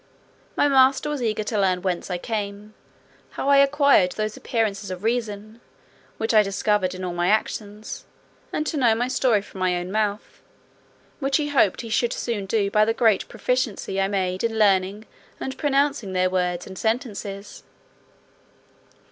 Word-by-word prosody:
My - - +4
master 270 +1 +4
was 290 -3 -3
eager 215 -2 -1
to 210 0 -2
learn 185 -2 +1
"whence 185 -1 -2
I 180 - -1
came; 210 +1 -5 0.6
how 275 - -1
I 280 - +6
acquired 280 -9 +4
those 215 0 -3
appearances 210 -4 -2
of 185 +1 -6
reason, 220 -1 -3 0.6
which 225 +1 -1
I 215 - +7
discovered 195 -1 0
in 185 - -7
all 180 -1 -3
my 175 0 0
actions; 210 0 -2 0.5
and 305 - -2
to 310 - -2
know 240 -5 +4
my 240 +2 -1
story 240 -5 +2
from 195 - -12
my 185 -1 +1
own 175 +1 -5
mouth, 210 0 -2 0.8
which 275 -1 +1
he 295 -2 -2
hoped 250 -9 +2
he 230 - -8
should 235 +2 +1
soon 210 -5 -3
do 200 -1 0
by 210 +1 +4
the 225 +1 +1
great 220 -5 +2
proficiency 225 -4 -1
I 195 - +2
made 185 -2 -1
in 225 -1 -1
learning 200 0 +2 0.3
and 265 - -4
pronouncing 280 -8 0
their 185 0 +1
words 180 -1 -1
and 190 - -9
sentences." 210 -3 -3
215 Hz, 165 wpm, -23 LUFS, 195-240 Hz, 0.8 s, I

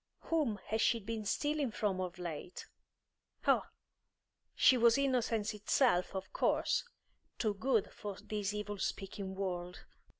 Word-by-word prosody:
Whom 300 -10 0
had 220 +1 0
she 235 - +3
been 220 +1 -4
stealing 290 +5 0
from 205 -4 -1
of 180 0 -4
late? 175 0 -6 0.8
Oh, - - +4 0.9
she 260 - +6
was 235 0 +5
innocence 240 -6 +1
itself, 210 -2 +2
of 190 0 -5
course; - - +2 0.5
too 215 -3 +1
good 225 0 +1
for 205 -2 -6
this 210 -2 -2
evil 205 -1 -4
speaking 195 0 -3
world. 180 -2 -4
210 Hz, 130 wpm, -34 LUFS, 190-235 Hz, 0.9 s, she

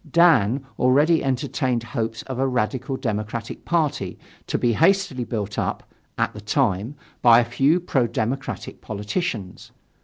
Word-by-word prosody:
Dan 135 - +4
already 145 +6 +4
entertained 130 -2 -1
hopes 115 -1 -3
of 130 -2 -6
a 135 - +2
radical 130 +2 -1
democratic 110 -1 -4
party 150 - 0 0.3
to - - 0
be 120 -1 +2
hastily 165 - +2
built 105 -4 -3
up, - - -2 0.3
at - - 0
the 105 - -9
time, 110 +1 0 0.3
by 120 -1 +7
a 120 - +2
few 135 +8 +2
pro 135 -8 +1
democratic 120 +4 -4
politicians. 105 - -4
125 Hz, 140 wpm, -23 LUFS, 110-140 Hz, 0.3 s, by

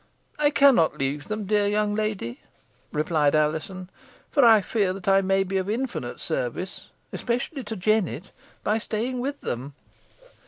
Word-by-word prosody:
"I 295 -1 +4
cannot 275 - +4
leave 140 +2 -2
them, 215 -1 -3
dear 205 0 +2
young 210 0 +1
lady," 210 - -3 0.5
replied 150 -1 +2
Alizon; 160 +5 -1 0.4
"for 280 - +4
I 225 -3 +7
feel 195 -2 0
I 195 0 +5
may 195 0 +2
be 195 0 -2
of 190 +1 -2
infinite 245 +4 -3
service - - -3 0.3
especially 250 +4 -2
to 220 +1 -5
Jennet 195 -2 0 0.3
by 215 +2 +1
staying 235 +4 -2
with 280 +3 -3
them. 135 +4 -5
205 Hz, 145 wpm, -25 LUFS, 180-230 Hz, 0.5 s, I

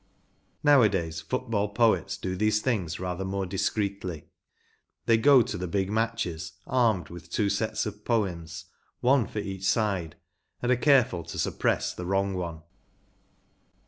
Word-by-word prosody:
Nowadays 100 - +3
Football 110 +2 -1
poets 110 -7 +2
do 95 0 -3
these 105 +2 +2
things 105 -9 -1
rather 90 0 -3
more 95 0 -2
discreetly. 95 -3 -2 0.8
They 115 - +4
go 130 +2 +6
to 90 -3 -4
big 95 +2 -1
matches 105 -7 -2
armed 110 - +1
with 85 0 -11
two 100 +3 0
sets 110 +1 -1
of 105 0 -7
poems, 85 -8 -2 0.4
one 130 -1 +3
for - - -9
each 95 -2 -4
side, 95 -6 0 0.4
and 125 - 0
are - - +5
careful 125 - +3
to - - -7
suppress - - 0
the 90 - -6
wrong 95 +1 +1
one. 85 -3 -5
100 Hz, 140 wpm, -27 LUFS, 90-115 Hz, 0.8 s, go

